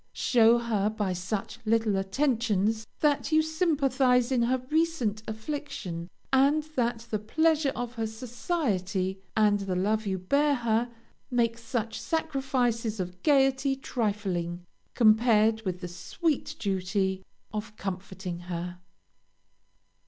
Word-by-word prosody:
Show 235 -1 +4
her 220 -4 0
by 210 -4 -2
such 185 +3 -4
little 225 -2 +2
attentions 220 0 0
that 295 +1 +2
you 315 0 +5
sympathize 275 -6 +2
in 250 -2 +2
her 245 +2 +2
recent 310 -10 +1
affliction, 220 - -5 0.2
and 280 +3 +4
that 235 -2 0
the 215 - 0
pleasure 310 +6 +2
of 245 -1 -4
her 225 -2 -2
society, 215 - -2 0.2
and 210 -1 +4
the 195 -2 -2
love 210 +4 0
you 190 -1 0
bear 280 +10 +2
her, 235 -1 0 0.4
make 235 -2 +1
such 230 -1 -3
sacrifices 260 -8 -1
of 180 0 -5
gayety 270 -2 +3
trifling, 200 - -2 0.3
compared 220 -1 +4
with 180 -1 -3
the 180 - -4
sweet 290 - -2
duty 190 -1 -1 0.3
of 210 0 -5
comforting 190 -2 -5
her. 175 0 -5
225 Hz, 120 wpm, -28 LUFS, 195-265 Hz, 0.4 s, you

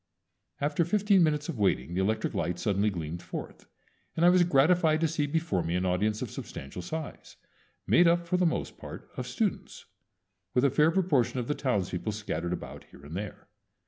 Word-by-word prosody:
After 145 +3 +1
fifteen 200 +2 +3
minutes 150 -2 +2
of 145 -9 -5
waiting 85 -6 +1
the 95 - 0
electric 110 +3 0
lights 90 +2 -2
suddenly 105 +1 +2
gleamed 85 -2 -5
forth, - - -8 0.5
and 165 - +4
I - - +8
was 180 0 +5
gratified 160 +1 +4
to 165 - +3
see 155 -2 -1
before 160 - 0
me 85 +1 -2
an 90 +1 0
audience 105 +4 0
of - - -6
substantial 70 +6 -7
size, 160 - -7 0.5
made 175 0 +5
up 170 0 +3
for 180 - +1
the 180 -1 +3
most 160 - -3
part - - -9
of - - -4
students, - - -3 0.7
with 125 +2 +4
a 140 - +3
fair 150 +4 +4
proportion 165 -10 +1
of 120 -2 -2
the 150 - +1
townspeople 105 -7 -1
scattered 85 -5 -3
about 90 - -6
here 70 - -16
and 75 +3 -8
there. 105 +1 -6
130 Hz, 190 wpm, -29 LUFS, -, 0.7 s, I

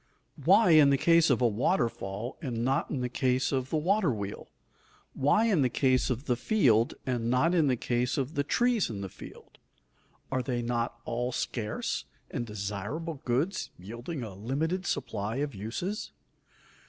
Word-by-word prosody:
Why 220 -6 +6
in 155 -3 +7
the 140 - +4
case 165 +2 +4
of - - +2
a - - +6
waterfall 115 - -1
and 120 -5 -2
not 135 +1 +1
in 135 - -2
the 125 - 0
case 130 +1 0
of 130 -2 -1
the 160 - 0
water 185 +1 +2
wheel? 100 -3 -5 0.7
Why 145 +12 +3
in 200 -9 +3
the 130 - +3
case 130 +1 +2
of 130 +2 -2
the 125 - +1
field 120 - +3
and 120 -3 -1
not 130 +8 +3
in 165 -5 +3
the 130 - +3
case 120 +1 -1
of 135 +2 -2
the 145 - 0
trees 240 - +2
in 100 -3 -5
the 95 - -5
field? - - -13 0.7
Are 130 -1 +1
they 125 -1 -2
not 120 0 -2
all 120 +2 -2
scarce 115 -3 -3 0.3
and 120 -1 -3
desirable 105 - -4
goods 145 +11 0
yielding 120 - -6
a 110 -4 -7
limited 150 - -2
supply 115 -5 -2
of 140 +1 -2
uses? 120 - -4
125 Hz, 170 wpm, -29 LUFS, 115-155 Hz, 0.7 s, in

